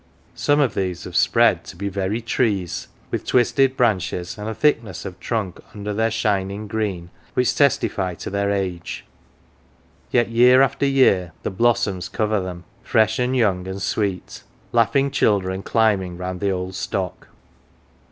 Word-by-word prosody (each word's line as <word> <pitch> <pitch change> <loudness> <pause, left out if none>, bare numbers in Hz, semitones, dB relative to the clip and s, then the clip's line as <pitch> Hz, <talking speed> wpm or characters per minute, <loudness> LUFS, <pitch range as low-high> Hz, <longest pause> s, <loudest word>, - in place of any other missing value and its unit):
Some 145 0 +1
of 135 -7 +2
these 95 -3 -2
have - - -8
spread - - +4
to - - -10
be 100 +3 -4
very 100 +3 -2
trees, 105 -6 -1 0.2
with - - -2
twisted 130 +2 +2
branches, 95 -6 0
and 105 +1 -5
a 110 - -4
thickness 115 - 0
of 90 -1 -7
trunk 105 -6 -3 0.2
under 105 0 -4
their 110 +2 +1
shining 105 -2 -1
green 100 -5 -3 0.2
which 125 -1 +2
testify 135 -10 +1
to - - -7
their 100 0 0
age; 95 -4 -3 1.0
yet 120 -2 +2
year 125 +3 +6
after 135 +1 +1
year 100 -11 +3
the - - -2
blossoms 100 -3 +1
cover 110 -1 0
them, 90 -1 -6 0.2
fresh 110 0 +2
and 125 +1 +1
young 95 -6 +1
and 95 +1 -5
sweet 100 -4 -2 0.3
laughing 135 +4 +2
children 95 -4 +1
climbing 100 -6 +1
round 90 0 -5
the 100 - 0
old 90 0 -3
stock. 95 0 -4
100 Hz, 150 wpm, -22 LUFS, 95-115 Hz, 1.0 s, year